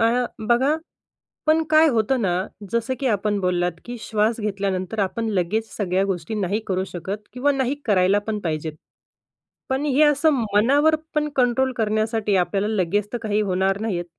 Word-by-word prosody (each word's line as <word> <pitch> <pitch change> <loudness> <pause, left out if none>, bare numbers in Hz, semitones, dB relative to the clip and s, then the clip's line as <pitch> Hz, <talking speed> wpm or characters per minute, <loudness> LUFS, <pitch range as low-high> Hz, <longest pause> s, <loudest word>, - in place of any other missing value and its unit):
अ, 235 +2 +3 0.2
बघा 260 +5 +3 0.7
पण 315 +1 +3
काय 315 +1 +6
होतं 240 +1 +1
ना, 185 -2 0 0.3
जसं 235 +3 0
की 270 - 0
आपण 210 -2 0
बोललात, 180 -1 +1
की 245 0 -6
श्वास 220 +1 0
घेतल्यानंतर 200 0 -2
आपण 225 +3 -1
लगेच 210 +3 -1
सगळ्या 190 -2 0
गोष्टी 190 +1 -3
नाही 205 +1 0
करू 185 -1 0
शकत 185 +4 -5 0.2
किंवा 260 +4 +2
नाही 270 0 0
करायला 195 -2 +3
पण 215 -1 -1
पाहिजेत. 160 -4 -3 1.0
पण 265 +2 0
हे 285 0 +2
असं 295 +1 +4 0.2
मनावर 285 +9 +4 0.2
पण 300 0 +1
कंट्रोल 255 +1 +2
करण्यासाठी 215 -1 0
आपल्याला 195 +3 0
लगेच 200 +2 0
तर - - 0
काही 215 -1 +1
होणार 190 0 0
नाहीयेत. 180 -6 -2
215 Hz, 160 wpm, -22 LUFS, 190-250 Hz, 1.0 s, काय